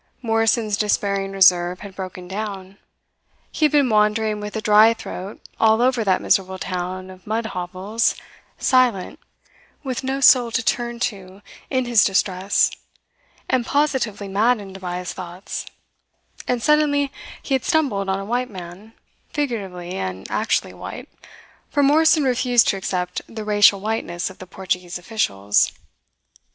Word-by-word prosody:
Morrison's 225 Hz, -2 st, +1 dB
despairing 200 Hz, -2 st, 0 dB
reserve 180 Hz, -2 st, +4 dB
had 200 Hz, -2 st, -10 dB
broken 185 Hz, -1 st, -7 dB
down. 195 Hz, -1 st, -6 dB, 0.7 s
He 310 Hz, -, +1 dB
had 300 Hz, -, +3 dB
been 285 Hz, -3 st, +4 dB
wandering 215 Hz, 0 st, +2 dB
with 210 Hz, +1 st, -6 dB
a -, -, -1 dB
dry 215 Hz, +1 st, +5 dB
throat 200 Hz, -2 st, -8 dB, 0.2 s
all 220 Hz, 0 st, +4 dB
over 250 Hz, -1 st, +2 dB
that 190 Hz, -3 st, +1 dB
miserable 190 Hz, -1 st, +1 dB
town 185 Hz, 0 st, -4 dB
of 185 Hz, +1 st, -16 dB
mud 220 Hz, +2 st, -1 dB
hovels, 190 Hz, +3 st, -1 dB, 0.4 s
silent, 245 Hz, -8 st, +1 dB, 0.6 s
with 260 Hz, -2 st, -3 dB
no 265 Hz, +1 st, -2 dB
soul 250 Hz, -3 st, +6 dB
to 255 Hz, -, 0 dB
turn 240 Hz, 0 st, -1 dB
to 195 Hz, -2 st, -4 dB, 0.3 s
in 260 Hz, -2 st, 0 dB
his 240 Hz, -3 st, +4 dB
distress, 190 Hz, 0 st, +2 dB, 0.8 s
and 255 Hz, -2 st, +1 dB
positively 260 Hz, -7 st, 0 dB
maddened 200 Hz, -1 st, 0 dB
by 180 Hz, -1 st, -4 dB
his 180 Hz, -1 st, -5 dB
thoughts; 180 Hz, +1 st, -7 dB, 0.8 s
and 245 Hz, -2 st, -1 dB
suddenly 290 Hz, -2 st, +2 dB, 0.3 s
he 275 Hz, -, -2 dB
had 265 Hz, -, +1 dB
stumbled 220 Hz, -12 st, 0 dB
on 190 Hz, 0 st, 0 dB
a 195 Hz, -, -6 dB
white 245 Hz, +4 st, -1 dB
man, 185 Hz, +3 st, -10 dB, 0.4 s
figuratively 195 Hz, -11 st, -4 dB
and 95 Hz, -, -4 dB
actually 220 Hz, -, 0 dB
white -, -, -8 dB, 0.6 s
for 285 Hz, -, +1 dB
Morrison 315 Hz, +2 st, +4 dB
refused 250 Hz, -2 st, +3 dB
to -, -, +1 dB
accept 180 Hz, -2 st, -3 dB
the 220 Hz, -2 st, -7 dB
racial 205 Hz, -1 st, +5 dB
whiteness 195 Hz, -4 st, -3 dB
of 190 Hz, -, -17 dB
the 185 Hz, -, -10 dB
Portuguese 180 Hz, -1 st, -3 dB
officials. 105 Hz, -, +1 dB
210 Hz, 140 wpm, -21 LUFS, 185-240 Hz, 0.8 s, soul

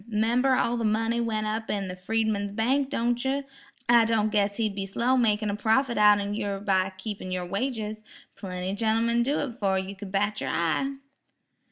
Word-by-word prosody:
'Member 235 Hz, +4 st, +2 dB
all 240 Hz, -1 st, +1 dB
the 230 Hz, -, -2 dB
money 225 Hz, +2 st, +1 dB
went 215 Hz, -2 st, -1 dB
up 220 Hz, +1 st, -3 dB
in 200 Hz, -2 st, -1 dB
the 180 Hz, -, -6 dB
Freedman's 205 Hz, +1 st, -1 dB
bank, 260 Hz, +6 st, +1 dB
don' 240 Hz, -3 st, +1 dB
yer? 270 Hz, +3 st, -1 dB, 0.4 s
I 235 Hz, -1 st, +6 dB
don' 220 Hz, -1 st, +1 dB
guess 200 Hz, -1 st, +1 dB
he'd 215 Hz, -3 st, 0 dB
be 195 Hz, -1 st, -4 dB
slow 235 Hz, +6 st, +1 dB
makin' 215 Hz, -4 st, +2 dB
a -, -, -2 dB
profit 235 Hz, +4 st, +1 dB
outen 205 Hz, -1 st, +4 dB
yer 200 Hz, -1 st, -2 dB
by 190 Hz, -2 st, +1 dB
keepin' 190 Hz, -2 st, -6 dB
yer 180 Hz, -1 st, -2 dB
wages. 215 Hz, +2 st, -3 dB, 0.3 s
Plenty 185 Hz, -1 st, -4 dB
gentmen'd 230 Hz, +2 st, +1 dB
do 285 Hz, +3 st, +1 dB
it 255 Hz, -5 st, -3 dB
'fore 195 Hz, -2 st, +1 dB
yer 190 Hz, +1 st, -3 dB
could 195 Hz, 0 st, -9 dB
bat 205 Hz, +2 st, 0 dB
yer -, -, -3 dB
eye." 170 Hz, -, 0 dB
215 Hz, 190 wpm, -27 LUFS, 200-235 Hz, 0.4 s, I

